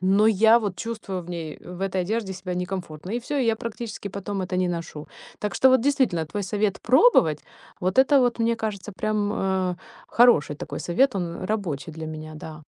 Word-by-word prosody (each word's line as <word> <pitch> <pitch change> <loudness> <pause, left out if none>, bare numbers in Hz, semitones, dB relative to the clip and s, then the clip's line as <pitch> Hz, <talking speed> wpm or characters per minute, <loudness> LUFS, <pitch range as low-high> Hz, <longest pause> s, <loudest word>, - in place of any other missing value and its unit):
но 195 +3 +4
я 220 +2 +6
вот 205 -5 -3
чувствую 195 -3 -5
в 175 - -10
ней, 165 -3 -5
э, 180 - -12
в 180 - -9
этой 190 -1 0
одежде 210 +1 -2
себя 180 -1 -5
некомфортно, 180 -2 -5
и 235 - -1
всё. 285 +4 -3
И 265 - +2
я 225 -1 +2
практически 225 -2 -6
потом 200 0 -4
это 180 0 -3
не 180 -1 +1
ношу. 165 -3 -5 0.3
Так 210 - -3
что 265 - +5
вот, 260 -2 +5
действительно, 250 - +1
твой 200 +7 -4
совет 205 +1 -1
пробовать- 235 - +4 0.4
вот 185 +5 -1
это 270 +1 +6
вот, 245 -2 +1
мне 230 0 +1
кажется, 210 -2 -4
прям, 205 +2 -1
а, 190 -3 -1 0.3
хороший 220 -12 +4
такой - - -6
совет. 255 +9 +2
Он 170 -1 -4
рабочий 175 -8 -3
для 160 0 -7
меня, 155 0 -7
да. 155 0 -9
195 Hz, 200 wpm, -24 LUFS, 175-225 Hz, 0.4 s, я